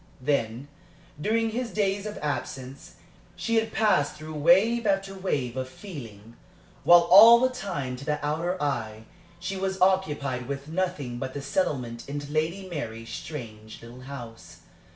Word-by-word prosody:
Then, 125 Hz, -2 st, -1 dB, 0.5 s
during 225 Hz, +4 st, +1 dB
his 240 Hz, +1 st, -3 dB
days 200 Hz, -1 st, -1 dB
of 210 Hz, -, -6 dB
absence, 135 Hz, -2 st, -5 dB, 0.4 s
she 230 Hz, 0 st, 0 dB
had 225 Hz, 0 st, +1 dB
passed 210 Hz, -10 st, +2 dB
through 155 Hz, +1 st, -8 dB
wave 195 Hz, +10 st, +4 dB
after 195 Hz, 0 st, 0 dB
wave 145 Hz, -11 st, -2 dB
of 130 Hz, 0 st, -3 dB
feeling, 115 Hz, -, -10 dB, 0.5 s
while 175 Hz, 0 st, +8 dB
all 210 Hz, +7 st, +9 dB
the 255 Hz, +1 st, +2 dB
time 175 Hz, -, -4 dB
to 140 Hz, -, -9 dB
the 150 Hz, 0 st, -2 dB
outer 170 Hz, +5 st, -1 dB
eye 110 Hz, -7 st, -2 dB, 0.4 s
she 180 Hz, +3 st, -4 dB
was 190 Hz, 0 st, -2 dB
occupied 150 Hz, -10 st, +1 dB
with 140 Hz, 0 st, -5 dB
nothing 155 Hz, -8 st, -2 dB
but 130 Hz, +1 st, -5 dB
the 145 Hz, -, -4 dB
settlement 130 Hz, -7 st, -2 dB
into 145 Hz, 0 st, -5 dB
Lady 165 Hz, +5 st, -1 dB
Mary's 115 Hz, -9 st, -6 dB
strange 110 Hz, -8 st, -8 dB
little 120 Hz, +2 st, -11 dB
house. 125 Hz, -4 st, -10 dB
150 Hz, 150 wpm, -26 LUFS, 130-195 Hz, 0.5 s, all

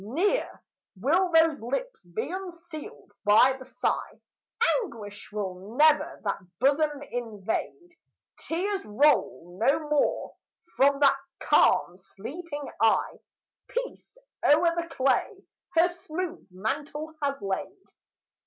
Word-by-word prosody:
Ne'er 355 Hz, -, -1 dB, 0.4 s
will 345 Hz, -, +2 dB
those 325 Hz, -4 st, +4 dB
lips 450 Hz, -, -4 dB
be 175 Hz, -, -4 dB
unsealed 345 Hz, -4 st, -8 dB
by 220 Hz, +6 st, +6 dB
the 260 Hz, -, -10 dB
sigh: -, -, -2 dB, 0.6 s
Anguish 215 Hz, -, -9 dB
will 200 Hz, +1 st, -5 dB
never 305 Hz, 0 st, +4 dB
that -, -, -1 dB, 0.2 s
bosom 285 Hz, +2 st, +2 dB
invade: 240 Hz, -, -4 dB, 0.4 s
Tears 385 Hz, +4 st, -2 dB
roll 205 Hz, -, +1 dB
no 275 Hz, +5 st, +4 dB
more 295 Hz, -, +1 dB, 0.4 s
from 275 Hz, +1 st, +4 dB
that 275 Hz, -1 st, +6 dB, 0.2 s
calm 185 Hz, -10 st, +3 dB
sleeping 290 Hz, -, -7 dB
eye: 225 Hz, -1 st, +2 dB, 0.5 s
Peace -, -, -5 dB, 0.3 s
o'er 335 Hz, +3 st, +5 dB
the 340 Hz, 0 st, -2 dB
clay 275 Hz, -, 0 dB, 0.3 s
her 335 Hz, +2 st, +6 dB
smooth 350 Hz, -, -6 dB
mantle 290 Hz, +11 st, -4 dB
has 280 Hz, -1 st, -1 dB
laid. 200 Hz, -, -4 dB
290 Hz, 105 wpm, -27 LUFS, 220-340 Hz, 0.6 s, by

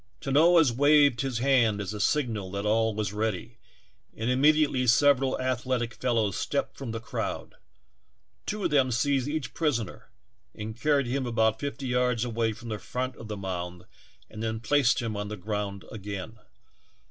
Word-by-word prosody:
Tanoa 160 Hz, +4 st, +5 dB
waved 145 Hz, -1 st, +4 dB
his 135 Hz, -3 st, -2 dB
hand 120 Hz, -5 st, +3 dB
as 105 Hz, 0 st, -4 dB
a 105 Hz, -, -6 dB
signal 110 Hz, -6 st, 0 dB
that 100 Hz, +1 st, -3 dB
all 110 Hz, 0 st, +2 dB
was 105 Hz, -2 st, -2 dB
ready, 105 Hz, -3 st, -3 dB, 0.6 s
and 115 Hz, +3 st, -1 dB
immediately 145 Hz, -1 st, +3 dB
several 135 Hz, +3 st, +4 dB
athletic 125 Hz, -1 st, -1 dB
fellows 115 Hz, -6 st, 0 dB
stepped -, -, -2 dB
from 135 Hz, -3 st, -7 dB
the 115 Hz, -, -4 dB
crowd; 115 Hz, -, -4 dB, 0.9 s
two 210 Hz, -1 st, -3 dB
of 175 Hz, -, 0 dB
them 135 Hz, -3 st, +3 dB
seized 130 Hz, +2 st, +1 dB
each 155 Hz, -1 st, -3 dB
prisoner 120 Hz, -, -2 dB, 0.5 s
and 110 Hz, +1 st, -6 dB
carried 140 Hz, +2 st, +2 dB
him 130 Hz, +1 st, -2 dB
about 110 Hz, -2 st, +1 dB
fifty 140 Hz, -1 st, -4 dB
yards 125 Hz, -2 st, +1 dB
away 115 Hz, -1 st, 0 dB
from 115 Hz, +2 st, -9 dB
the 105 Hz, -1 st, -3 dB
front 125 Hz, +5 st, -4 dB
of 115 Hz, -, -10 dB
the 105 Hz, -1 st, -5 dB
mound 90 Hz, -2 st, -5 dB, 0.4 s
and 110 Hz, -, -9 dB
then 110 Hz, 0 st, -2 dB
placed 125 Hz, +1 st, +2 dB
him 110 Hz, -2 st, -3 dB
on 105 Hz, 0 st, -3 dB
the 105 Hz, +1 st, -6 dB
ground 100 Hz, 0 st, -4 dB
again. 105 Hz, +1 st, -7 dB
120 Hz, 165 wpm, -27 LUFS, 110-135 Hz, 0.9 s, Tanoa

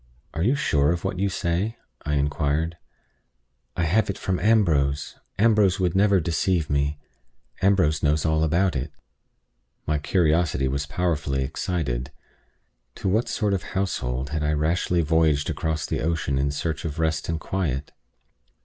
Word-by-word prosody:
"Are 80 Hz, -, -3 dB
you 120 Hz, +10 st, +3 dB
sure 75 Hz, -, +2 dB
of 85 Hz, -1 st, -2 dB
what 90 Hz, -, -2 dB
you 100 Hz, +1 st, +1 dB
say?" 95 Hz, +4 st, -1 dB, 0.3 s
I 75 Hz, -, -1 dB
inquired. 75 Hz, +3 st, 0 dB, 1.0 s
"I 85 Hz, -, +1 dB
have 100 Hz, +6 st, +2 dB
it 100 Hz, -, -2 dB
from 95 Hz, -2 st, -1 dB
Ambrose. 80 Hz, -9 st, +2 dB, 0.2 s
Ambrose 105 Hz, -4 st, +3 dB
would 90 Hz, -2 st, 0 dB
never 100 Hz, 0 st, +4 dB
deceive 85 Hz, -1 st, 0 dB
me. 70 Hz, +1 st, 0 dB, 0.6 s
Ambrose 90 Hz, -6 st, +3 dB
knows 75 Hz, 0 st, +1 dB
all 80 Hz, 0 st, +2 dB
about 85 Hz, +2 st, +2 dB
it." 65 Hz, -, -3 dB, 0.9 s
My 75 Hz, 0 st, 0 dB
curiosity 80 Hz, -3 st, +1 dB
was 70 Hz, +2 st, -2 dB
powerfully 75 Hz, -5 st, -1 dB
excited. 70 Hz, -3 st, -3 dB, 0.8 s
To 95 Hz, -, -2 dB
what 110 Hz, +5 st, +1 dB
sort 105 Hz, -3 st, 0 dB
of 95 Hz, -, 0 dB, 0.2 s
household 65 Hz, -8 st, -2 dB
had 80 Hz, -1 st, -1 dB
I 75 Hz, 0 st, +1 dB
rashly 85 Hz, +3 st, +1 dB
voyaged 80 Hz, -2 st, +2 dB
across 80 Hz, -1 st, -2 dB
the -, -, -2 dB
ocean 80 Hz, -4 st, 0 dB
in 70 Hz, +1 st, +1 dB
search 80 Hz, +3 st, -3 dB
of 80 Hz, -2 st, -4 dB
rest 80 Hz, -1 st, -1 dB
and 80 Hz, -1 st, -1 dB
quiet? 75 Hz, -9 st, -2 dB
80 Hz, 150 wpm, -24 LUFS, 75-95 Hz, 1.0 s, never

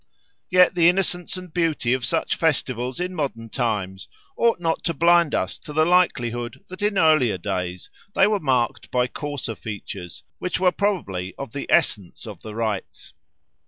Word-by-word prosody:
Yet 180 Hz, 0 st, +5 dB
the 170 Hz, -1 st, +5 dB
innocence 180 Hz, -1 st, 0 dB
and 180 Hz, -3 st, -10 dB
beauty 160 Hz, -8 st, +1 dB
of 130 Hz, -1 st, -1 dB
such 125 Hz, -, 0 dB
festivals 130 Hz, -5 st, -1 dB
in 180 Hz, +1 st, -2 dB
modern 130 Hz, -8 st, -3 dB
times 105 Hz, -6 st, -2 dB, 0.3 s
ought 230 Hz, -5 st, +2 dB
not 165 Hz, -2 st, -1 dB
to 170 Hz, -, 0 dB
blind 170 Hz, 0 st, +4 dB
us 95 Hz, -, -2 dB
to 150 Hz, -, -9 dB
the 155 Hz, +1 st, +3 dB
likelihood 120 Hz, -10 st, +1 dB
that 185 Hz, +2 st, -9 dB
in 205 Hz, -1 st, +1 dB
earlier 155 Hz, -, +4 dB
days 90 Hz, -1 st, -4 dB, 0.3 s
they 195 Hz, -, +6 dB
were 210 Hz, 0 st, +2 dB
marked 130 Hz, -6 st, 0 dB
by 125 Hz, -1 st, +2 dB
coarser 145 Hz, -2 st, -5 dB
features, 100 Hz, -5 st, -8 dB, 0.2 s
which 180 Hz, -, -2 dB
were 185 Hz, -1 st, +4 dB
probably 100 Hz, -, -2 dB
of 140 Hz, -5 st, -7 dB
the 140 Hz, -, -5 dB
essence 100 Hz, 0 st, +1 dB
of 105 Hz, -6 st, -9 dB
the 110 Hz, -1 st, -8 dB
rites. 110 Hz, -4 st, -4 dB
140 Hz, 165 wpm, -23 LUFS, 110-175 Hz, 0.3 s, they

